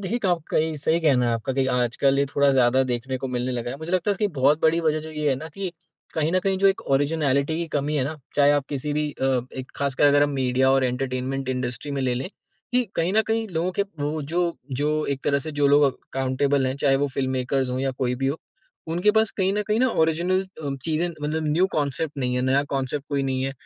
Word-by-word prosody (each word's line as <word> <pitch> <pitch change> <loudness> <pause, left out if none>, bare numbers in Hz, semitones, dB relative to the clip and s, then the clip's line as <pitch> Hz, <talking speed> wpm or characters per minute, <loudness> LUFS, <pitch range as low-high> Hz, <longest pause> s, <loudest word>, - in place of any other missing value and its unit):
देखिए, 210 +5 -2
क - - +4
आपका 175 -3 0
ये 155 0 0
सही 160 +3 +1
कहना 130 -7 +3
है 120 - +1
आपका 115 +4 -3
कि 135 0 +1
आजकल 125 +2 +1
ये 140 - +3
थोड़ा 140 0 +2
ज़्यादा 130 0 +4
देखने 125 +2 -2
को 135 0 -4
मिलने 125 0 -2
लगा 120 0 -3
है। 135 - -5
मुझे 160 +3 -7
लगता 185 +2 +1
है - - +4
इसकी 210 +2 0
बहुत 145 +4 +4
बड़ी 160 +1 +4
वज़ह 155 -1 +1
जो 160 +1 -8
ये 150 -1 -1
है 135 - +3
ना 155 +4 -7
कि 195 -2 -3 0.4
कहीं 160 0 +1
न 185 - +4
कहीं 195 -1 +2
जो 195 - +4
एक 195 0 +3
ऑरिजिनैलिटी 145 0 +1
की 170 - -2
कमी 145 +1 0
है 130 - +1
ना 155 +3 -4 0.2
चाहे 145 0 +5
आप 145 -2 +1
किसी 145 +1 -3
भी 150 0 -1
अ, 135 - -5 0.3
एक 130 0 -6
ख़ासकर 140 0 +1
अगर 145 0 +5
हम 145 - +2
मीडिया 130 0 +2
और 135 -1 +3
एंटरटेनमेंट 130 +1 -2
इंडस्ट्री 125 +2 -3
में 140 - -2
ले, 125 -1 +1
लें। 130 +7 -3 0.4
कि 250 0 +3
कहीं 170 +3 +1
न 220 - +5
कहीं 225 0 0
लोगों 170 +3 0
के 200 - +5 0.2
वो 150 +2 -1
जो 170 +3 -1 0.2
जो 150 +1 +1
एक 135 - -5
तरह 140 -1 +2
से 155 +3 -5
जो 145 -1 +2
लोग 145 +1 +5
अकाउंटेबल 135 +1 0
हैं, 130 - -1
चाहे 140 -1 +3
वो 145 +1 +1
फ़िल्म 130 -1 -1
मेकर्स 130 0 0
हो 125 - -2
या 135 0 0
कोई 125 -1 0
भी 135 +2 -2
हो, 140 - 0 0.5
उनके 175 +6 +2
पास 220 +1 +2
कहीं 190 -1 +1
न 210 +1 0
कहीं 215 +2 +2
न, 260 - +4
ऑरिजिनल 175 -2 +1
अ, 160 -7 -6
चीज़ें 165 +2 0
मतलब 155 -1 -3
न्यू 175 +5 +3
कॉन्सेप्ट 145 0 -2
नहीं 125 -1 -1
है, 125 - 0
नया 135 +2 +2
कॉन्सेप्ट 135 +1 -2
कोई 140 -2 0
नहीं 130 -1 -1
है। 135 - -2
145 Hz, 255 wpm, -24 LUFS, 130-160 Hz, 0.5 s, चाहे